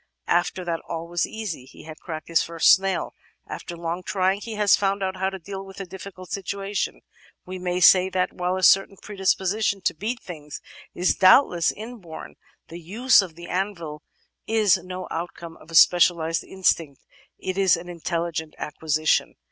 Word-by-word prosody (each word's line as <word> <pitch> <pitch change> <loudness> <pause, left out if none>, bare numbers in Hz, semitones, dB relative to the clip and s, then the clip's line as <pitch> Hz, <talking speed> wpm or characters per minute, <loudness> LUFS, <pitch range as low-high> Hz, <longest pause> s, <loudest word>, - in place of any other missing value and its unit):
After 175 +1 0
that 165 -1 -2
all 165 0 -4
was 175 0 -1
easy. 210 -12 -6
He 130 - -15
had 155 0 -10
cracked 155 -3 -7
his 165 -1 +3
first 165 -1 +3
snail. 195 0 +2 0.3
After 170 - -7
long 170 +1 -3
trying 190 +2 0
he 225 0 -6
had 210 -1 +2
found 195 0 +3
out 190 0 -2
how 190 +1 0
to 195 - -7
deal 195 +2 -7
with 195 0 -12
a 195 - -5
difficult 185 0 -10
situation. 200 +1 -3 0.4
We 185 0 -7
may 180 0 -2
say, 185 +1 +7
then, 185 -1 0
that - - -25
while 180 0 -1
a 185 - -4
certain 195 +1 +5
predisposition 195 +1 0
to - - +1
beat 220 +9 -4
things 150 -4 -9 0.4
is 180 +1 +2
doubtless 185 -3 +5
inborn, 215 -7 -9 0.4
the 170 - -8
use 215 +9 +4
of 180 -5 -8
the 170 +1 -10
anvil 170 -6 -3 0.5
is 215 -4 +4
no 185 0 -6
outcome 170 0 -6
of 155 - -18
a 165 - -7
specialised 165 -2 +5
instinct, 165 -7 -1 0.3
it 185 -1 -4
is 190 -3 +4
an 170 +1 -9
intelligent 170 -2 -3
acquisition." 155 0 0
185 Hz, 175 wpm, -24 LUFS, 170-195 Hz, 0.5 s, say